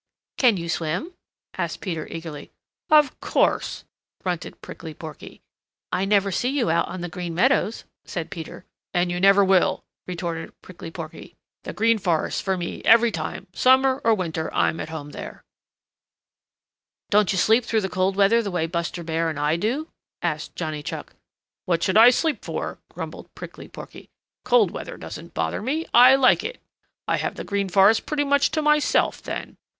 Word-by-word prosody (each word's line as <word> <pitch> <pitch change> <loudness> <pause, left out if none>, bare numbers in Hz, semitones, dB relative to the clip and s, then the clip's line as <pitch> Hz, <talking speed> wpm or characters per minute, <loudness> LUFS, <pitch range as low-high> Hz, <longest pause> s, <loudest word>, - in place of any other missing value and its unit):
"Can 240 -6 +5
you 170 -1 -5
swim?" 170 - -2 0.5
asked - - -2
Peter 165 -6 -4
eagerly. 160 -3 -7 0.4
"Of 300 -3 +4
course," - - 0 0.4
grunted 180 -3 -4
Prickly 160 -2 -9
Porky. 155 -3 -10 0.5
"I 190 - 0
never 200 -1 +2
see 245 +7 0
you 270 - +1
out 170 +1 +1
on 185 - -6
the 175 - -3
Green 175 0 -5
Meadows," 235 +1 +2 0.2
said 170 -4 -5
Peter. 165 +1 -8 0.3
"And 175 0 +2
you 175 - -2
never 195 +1 +6
will," 190 -1 +3 0.2
retorted 170 -2 -5
Prickly 175 -2 -9
Porky. 165 -1 -9 0.3
"The - - -5
Green 225 +1 +2
Forest 175 -5 0
for 190 -1 -1
me 175 -1 -5
every 230 +1 +6
time. 190 - -5
Summer 260 +1 +4
or 225 - +4
winter, 160 -4 -3
I'm 160 - +1
at - - -5
home 150 -2 -7
there." - - -9 1.7
"Don't 210 -1 +4
you 195 - -1
sleep 220 +6 +4
through 225 -1 0
the 190 - -1
cold 185 +1 0
weather 205 +4 +4
the 205 - -4
way 175 -3 -1
Buster 170 +1 -3
Bear 165 0 -1
and 155 -2 -4
I 150 +2 +2
do?" 240 - -1 0.4
asked 155 -2 -3
Johnny 155 -3 -4
Chuck. - - -7 0.5
"What 170 -2 0
should 190 - +1
I 225 +3 +9
sleep 310 +5 0
for?" - - -4
grumbled - - -8
Prickly - - -9
Porky. - - -11 0.4
"Cold 485 -3 +4
weather - - -7
doesn't - - -9
bother - - -1
me. 300 +8 -2
I 250 +2 +8
like 265 -2 +4
it. - - -5 0.5
I - - +2
have - - -3
the - - -6
Green 200 -1 -2
Forest 195 +4 +4
pretty 295 -1 0
much 285 0 +3
to 310 - -1
myself 300 0 +2
then. - - -6
190 Hz, 175 wpm, -24 LUFS, 165-235 Hz, 1.7 s, I